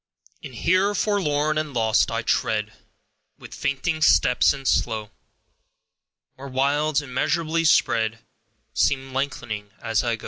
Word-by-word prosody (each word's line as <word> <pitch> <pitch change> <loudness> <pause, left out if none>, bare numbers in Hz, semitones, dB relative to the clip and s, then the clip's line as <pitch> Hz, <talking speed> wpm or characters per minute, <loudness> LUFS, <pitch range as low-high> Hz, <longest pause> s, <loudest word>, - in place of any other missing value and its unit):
And 130 -3 -9
here, 185 - +2
forlorn 155 -8 0
and 150 -3 -5
lost, 110 -1 +2
I 115 +1 -2
tread, 110 -1 -1 0.6
With - - -12
fainting 155 +4 -2
steps, 125 -4 +4
and 135 -1 -5
slow; 110 -4 0 1.2
Where 135 +1 -10
wilds, 145 +3 0
immeasurably 160 +5 -1
spread, 115 -6 +2 0.6
Seem 135 -1 0
length'ning 130 -7 -4
as 115 -2 0
I 120 -1 0
go. - - -15
135 Hz, 125 wpm, -23 LUFS, 115-155 Hz, 1.2 s, steps